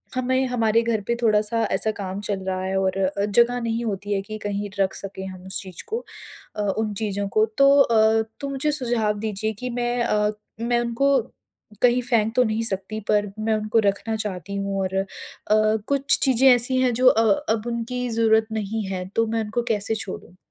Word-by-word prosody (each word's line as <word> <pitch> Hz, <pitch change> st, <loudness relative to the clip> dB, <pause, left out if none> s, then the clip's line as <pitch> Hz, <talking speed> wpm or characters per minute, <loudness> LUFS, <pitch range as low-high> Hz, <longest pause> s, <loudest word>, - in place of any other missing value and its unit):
हमें 260 Hz, +1 st, +1 dB
हमारे 230 Hz, -2 st, +2 dB
घर 230 Hz, -2 st, 0 dB
पे 235 Hz, -, +1 dB
थोड़ा-सा 215 Hz, 0 st, +2 dB
ऐसा 220 Hz, -, +1 dB
काम 195 Hz, -2 st, -5 dB
चल 200 Hz, -2 st, -3 dB
रहा 185 Hz, 0 st, -1 dB
है 190 Hz, +1 st, -2 dB
और 190 Hz, +1 st, 0 dB
जगह 240 Hz, +3 st, +3 dB
नहीं 230 Hz, 0 st, -2 dB
होती 205 Hz, -1 st, -3 dB
है 195 Hz, -, 0 dB
कि 215 Hz, +2 st, -7 dB
कहीं 205 Hz, 0 st, -3 dB
रख 195 Hz, -1 st, +2 dB
सकें 190 Hz, -1 st, -7 dB
हम 185 Hz, -1 st, -10 dB
उस 190 Hz, -, -4 dB
चीज़ 185 Hz, -3 st, -10 dB
को 460 Hz, +3 st, -4 dB, 0.5 s
अ, 210 Hz, -, -2 dB, 0.2 s
उन 215 Hz, -1 st, -1 dB
चीज़ों 200 Hz, -1 st, -2 dB
को। 215 Hz, +2 st, +3 dB
तो 275 Hz, 0 st, +6 dB
अ, 225 Hz, -3 st, +4 dB, 0.2 s
तो 280 Hz, -1 st, -4 dB
मुझे 275 Hz, +2 st, -1 dB
सुझाव 235 Hz, -7 st, 0 dB
दीजिए 220 Hz, 0 st, -2 dB
कि 250 Hz, +5 st, -6 dB
मैं 240 Hz, 0 st, -1 dB
अ, 210 Hz, -1 st, +1 dB, 0.3 s
मैं 240 Hz, +1 st, +1 dB
उनको 250 Hz, +4 st, +2 dB, 0.6 s
कहीं 245 Hz, 0 st, +4 dB
फेंक 230 Hz, -3 st, +1 dB
तो 250 Hz, -, +5 dB
नहीं 220 Hz, 0 st, -1 dB
सकती 210 Hz, 0 st, -3 dB
पर, 205 Hz, -1 st, +2 dB
मैं 220 Hz, +1 st, 0 dB
उनको 215 Hz, +1 st, +1 dB
रखना 205 Hz, +3 st, 0 dB
चाहती 200 Hz, -3 st, -5 dB
हूँ 195 Hz, 0 st, -2 dB
और 190 Hz, 0 st, -2 dB
अ, 195 Hz, -, +1 dB, 0.8 s
कुछ 280 Hz, -1 st, +2 dB
चीज़ें 265 Hz, 0 st, +4 dB
ऐसी 245 Hz, +2 st, +1 dB
हैं 250 Hz, -2 st, +2 dB
जो 255 Hz, +2 st, +3 dB
अ, 225 Hz, -2 st, +5 dB, 0.3 s
अब 225 Hz, +1 st, -4 dB
उनकी 240 Hz, +1 st, -3 dB
जरूरत 225 Hz, -1 st, +3 dB
नहीं 220 Hz, 0 st, -2 dB
है, 185 Hz, -1 st, -4 dB
तो 230 Hz, -, +3 dB
मैं 225 Hz, 0 st, -1 dB
उनको 220 Hz, +3 st, -2 dB
कैसे 215 Hz, +1 st, -1 dB
छोड़ूँ? 185 Hz, -3 st, -7 dB
220 Hz, 195 wpm, -23 LUFS, 200-240 Hz, 0.8 s, तो